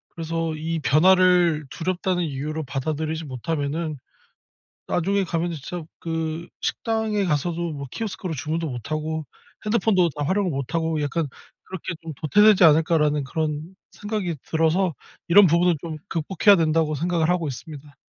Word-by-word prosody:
그래서 165 Hz, 0 st, -2 dB
이 160 Hz, +1 st, -3 dB
변화를 175 Hz, +1 st, +4 dB
두렵다는 180 Hz, +1 st, -1 dB
이유로 155 Hz, +2 st, -3 dB
받아들이지 155 Hz, +4 st, -3 dB
못하면은 150 Hz, +3 st, -3 dB, 0.9 s
나중에 195 Hz, +3 st, +1 dB
가면은 170 Hz, 0 st, -2 dB
진짜 160 Hz, +3 st, -6 dB
그 165 Hz, 0 st, -3 dB
식당에 220 Hz, -3 st, -1 dB
가서도 170 Hz, +1 st, -1 dB
뭐 140 Hz, -1 st, -6 dB
키오스크로 190 Hz, -6 st, -4 dB
주문도 160 Hz, +2 st, -2 dB
못하고 155 Hz, +5 st, -3 dB, 0.4 s
핸드폰도 205 Hz, -5 st, +3 dB
다 145 Hz, 0 st, -4 dB
활용을 190 Hz, +3 st, +1 dB
못하고 160 Hz, +3 st, -1 dB
약간 150 Hz, +2 st, -1 dB, 0.4 s
그렇게 185 Hz, -2 st, -6 dB
좀 165 Hz, -1 st, -7 dB
'도태되지 200 Hz, +8 st, +5 dB
않을까?'라는 150 Hz, -2 st, +4 dB
그런 155 Hz, +4 st, -3 dB, 0.2 s
생각이 205 Hz, -6 st, -3 dB
들어서 165 Hz, +3 st, +1 dB, 0.3 s
이런 190 Hz, +2 st, +7 dB
부분은 170 Hz, +2 st, +3 dB
좀 160 Hz, -2 st, -5 dB
극복해야 190 Hz, +5 st, +3 dB
된다고 160 Hz, -2 st, +1 dB
생각을 170 Hz, +1 st, 0 dB
하고 175 Hz, -3 st, +1 dB
있습니다. 145 Hz, +1 st, -9 dB
165 Hz, 350 characters per minute, -24 LUFS, 155-180 Hz, 0.9 s, 이런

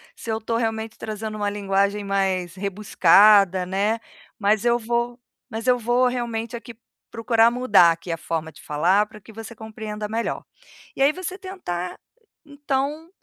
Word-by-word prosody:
se 225 Hz, -, -6 dB
eu 220 Hz, -, 0 dB
estou 230 Hz, +1 st, -2 dB
realmente 225 Hz, -1 st, -3 dB
trazendo 215 Hz, 0 st, -5 dB
uma 205 Hz, -1 st, -1 dB
linguagem 200 Hz, 0 st, 0 dB
mais 190 Hz, -3 st, -1 dB
rebuscada, 195 Hz, -1 st, +4 dB
né, 200 Hz, +5 st, 0 dB, 0.4 s
mas 210 Hz, +1 st, +2 dB
eu 240 Hz, 0 st, +3 dB
vou 240 Hz, +1 st, -2 dB, 0.3 s
mas 225 Hz, +2 st, -5 dB
eu 250 Hz, 0 st, +5 dB
vou 240 Hz, +2 st, +2 dB
realmente, 235 Hz, -2 st, -3 dB
aqui, 235 Hz, 0 st, -9 dB, 0.4 s
procurar 230 Hz, 0 st, +3 dB
mudar, 215 Hz, -9 st, +5 dB
aqui, 170 Hz, +1 st, -8 dB
a 165 Hz, -, -2 dB
forma 160 Hz, -1 st, -4 dB
de 150 Hz, -, -16 dB
falar, 175 Hz, +8 st, +2 dB
pra 215 Hz, 0 st, -14 dB
que 220 Hz, -, -14 dB
você 225 Hz, +1 st, -9 dB
compreenda 215 Hz, -1 st, -6 dB
melhor". 230 Hz, +2 st, -2 dB, 0.5 s
E -, -, -4 dB
aí 285 Hz, +2 st, +4 dB
você 370 Hz, +1 st, -6 dB
tentar, 360 Hz, -, -5 dB, 0.5 s
então, 285 Hz, +2 st, -3 dB
220 Hz, 160 wpm, -23 LUFS, 195-235 Hz, 0.5 s, eu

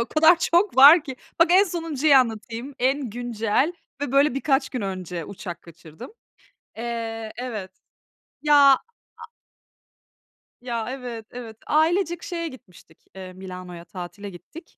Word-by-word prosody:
O 235 Hz, -, -1 dB
kadar 320 Hz, +2 st, +5 dB
çok 345 Hz, +2 st, +1 dB
var 290 Hz, +5 st, +9 dB
ki. 265 Hz, -3 st, -7 dB, 0.2 s
Bak 335 Hz, 0 st, +5 dB
en 385 Hz, +2 st, +6 dB
sonuncuyu 320 Hz, -5 st, +1 dB
anlatayım: 235 Hz, +1 st, 0 dB
En 265 Hz, 0 st, 0 dB
güncel 240 Hz, +5 st, -1 dB, 0.3 s
ve 285 Hz, -3 st, -3 dB
böyle 280 Hz, 0 st, +3 dB
birkaç 275 Hz, -1 st, +1 dB
gün 250 Hz, -, -5 dB
önce 185 Hz, -3 st, -5 dB
uçak 180 Hz, -1 st, -8 dB
kaçırdım. 165 Hz, -, -13 dB, 0.7 s
Eee, 225 Hz, -1 st, -5 dB
evet. 220 Hz, -7 st, -6 dB, 0.7 s
Ya, 300 Hz, -1 st, +3 dB, 0.2 s
aaa 265 Hz, -, +3 dB, 1.8 s
Ya, 235 Hz, -3 st, -3 dB
evet, 245 Hz, -4 st, -7 dB
evet. 230 Hz, -3 st, -9 dB
Ailecek 335 Hz, +3 st, +1 dB
şeye 335 Hz, -1 st, -4 dB
gitmiştik, 190 Hz, -, -15 dB, 0.2 s
eee, 185 Hz, -1 st, -9 dB
Milano'ya 180 Hz, -2 st, -9 dB
tatile 190 Hz, +3 st, -8 dB
gittik. 195 Hz, -, -14 dB
245 Hz, 130 wpm, -23 LUFS, 200-295 Hz, 1.8 s, var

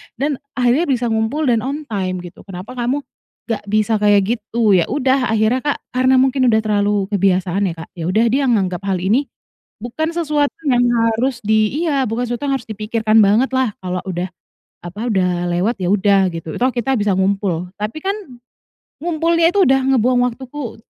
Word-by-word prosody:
dan 275 Hz, +2 st, -2 dB, 0.2 s
akhirnya 255 Hz, +6 st, +2 dB
bisa 245 Hz, -4 st, 0 dB
ngumpul 220 Hz, +8 st, 0 dB
dan 230 Hz, -, +2 dB
on 280 Hz, +6 st, -4 dB
time 185 Hz, -7 st, -3 dB
gitu, 175 Hz, -, -11 dB
kenapa 185 Hz, +3 st, -8 dB
kamu 255 Hz, +4 st, -1 dB, 0.5 s
gak 225 Hz, -, -1 dB
bisa 215 Hz, +1 st, +1 dB
kayak 205 Hz, +2 st, +3 dB
gitu?" 220 Hz, 0 st, 0 dB
Ya 180 Hz, -4 st, +3 dB
udah 265 Hz, -1 st, +1 dB
akhirnya, 220 Hz, +3 st, +2 dB
Kak, 290 Hz, +2 st, -3 dB
karena 255 Hz, +1 st, +3 dB
mungkin 260 Hz, 0 st, +3 dB
udah 220 Hz, -2 st, +3 dB
terlalu 205 Hz, -1 st, 0 dB
kebiasaan 195 Hz, 0 st, +1 dB
ya, 170 Hz, -, -3 dB
Kak, 165 Hz, 0 st, -10 dB
ya 170 Hz, -3 st, -5 dB
udah 215 Hz, +6 st, +2 dB
dia 270 Hz, +1 st, +1 dB
nganggap 190 Hz, -7 st, +1 dB
hal 185 Hz, -2 st, -1 dB
ini 240 Hz, +9 st, +2 dB, 0.6 s
bukan 315 Hz, +7 st, -3 dB
sesuatu 300 Hz, -4 st, 0 dB
yang 245 Hz, -1 st, +3 dB, 0.3 s
harus 245 Hz, +1 st, -2 dB
di 215 Hz, +8 st, +1 dB
iya 280 Hz, -4 st, +1 dB
bukan 225 Hz, +3 st, -2 dB
sesuatu 240 Hz, +4 st, -3 dB
yang 275 Hz, -, +1 dB
harus 235 Hz, -, -14 dB
dipikirkan 215 Hz, +1 st, 0 dB
banget 215 Hz, +6 st, +4 dB
lah 260 Hz, -4 st, 0 dB
kalau 180 Hz, 0 st, -2 dB
udah, 180 Hz, 0 st, -3 dB, 0.6 s
apa 175 Hz, +4 st, -8 dB
udah 180 Hz, -3 st, 0 dB
lewat 185 Hz, +8 st, 0 dB
ya 175 Hz, -, 0 dB
udah 195 Hz, -1 st, +3 dB
gitu, 165 Hz, -2 st, -7 dB
toh 255 Hz, +2 st, +3 dB
kita 255 Hz, +2 st, -1 dB
bisa 205 Hz, -2 st, +1 dB
ngumpul, 190 Hz, -3 st, 0 dB
tapi 215 Hz, +7 st, -3 dB
kan 390 Hz, +1 st, 0 dB, 0.9 s
ngumpulnya 335 Hz, 0 st, +2 dB
itu 395 Hz, 0 st, +3 dB
udah 265 Hz, 0 st, +4 dB
ngebuang 250 Hz, +1 st, +2 dB
waktuku 260 Hz, 0 st, -8 dB
225 Hz, 180 wpm, -18 LUFS, 195-260 Hz, 0.9 s, banget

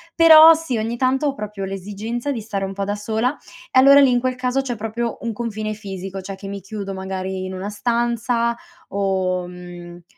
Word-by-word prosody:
però 325 Hz, -1 st, +9 dB
sì 315 Hz, -7 st, -3 dB
ogni 225 Hz, +2 st, -3 dB
tanto 265 Hz, +3 st, +1 dB
ho 280 Hz, -, 0 dB
proprio 210 Hz, -4 st, -5 dB
l'esigenza 210 Hz, +7 st, -4 dB
di 240 Hz, -5 st, -3 dB
stare 200 Hz, -2 st, -3 dB
un 195 Hz, -, -5 dB
po' 200 Hz, +1 st, -3 dB
da 205 Hz, +1 st, -2 dB
sola 220 Hz, +6 st, -1 dB, 0.3 s
e -, -, +2 dB
allora 275 Hz, +2 st, +8 dB
lì 275 Hz, -, +6 dB
in 245 Hz, -1 st, +3 dB
quel 255 Hz, +1 st, -1 dB
caso, 255 Hz, +1 st, 0 dB
c'è 250 Hz, -3 st, -4 dB
proprio 225 Hz, +2 st, -4 dB
un 230 Hz, -1 st, -3 dB
confine 215 Hz, -1 st, -4 dB
fisico, 195 Hz, -2 st, -7 dB
cioè 195 Hz, +1 st, -7 dB
che 195 Hz, +1 st, -10 dB
mi 200 Hz, 0 st, -6 dB
chiudo 195 Hz, 0 st, -6 dB
magari 190 Hz, 0 st, -4 dB
in 185 Hz, -, -6 dB
una 190 Hz, +2 st, -5 dB
stanza 235 Hz, +2 st, 0 dB, 0.3 s
o, 190 Hz, -2 st, -1 dB
mhmm 175 Hz, -1 st, -11 dB
215 Hz, 200 wpm, -21 LUFS, 195-245 Hz, 0.3 s, però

